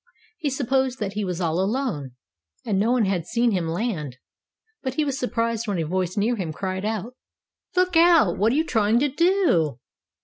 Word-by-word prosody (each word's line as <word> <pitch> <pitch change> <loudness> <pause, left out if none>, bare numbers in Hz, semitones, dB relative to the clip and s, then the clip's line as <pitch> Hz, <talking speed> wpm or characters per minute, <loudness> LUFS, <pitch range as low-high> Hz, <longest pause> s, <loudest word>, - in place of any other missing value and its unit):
He 295 - -1
supposed 265 -1 0
that 205 -4 -3
he 210 +1 -2
was 180 -2 -3
all 170 -1 0
alone, 195 - -2 0.5
and 200 -4 0
no 220 +4 +2
one 245 -4 +3
had 180 -4 -1
seen 235 0 +1
him 180 -5 -1
land, 165 - -3 0.6
but 260 -1 -4
he 305 - +1
was 275 -1 -2
surprised 230 -2 -1
when 200 -3 -1
a 165 - -1
voice 185 +2 -2
near 225 +4 +2
him 175 -5 -3
cried 190 +3 -4
out: 220 +2 -3 0.6
"Look 365 -1 +2
out! 330 - +5
What 215 +3 +3
are - - 0
you 315 +2 +2
trying 220 -4 +2
to 285 +4 +2
do?" 305 - +2
220 Hz, 195 wpm, -24 LUFS, 185-260 Hz, 0.6 s, out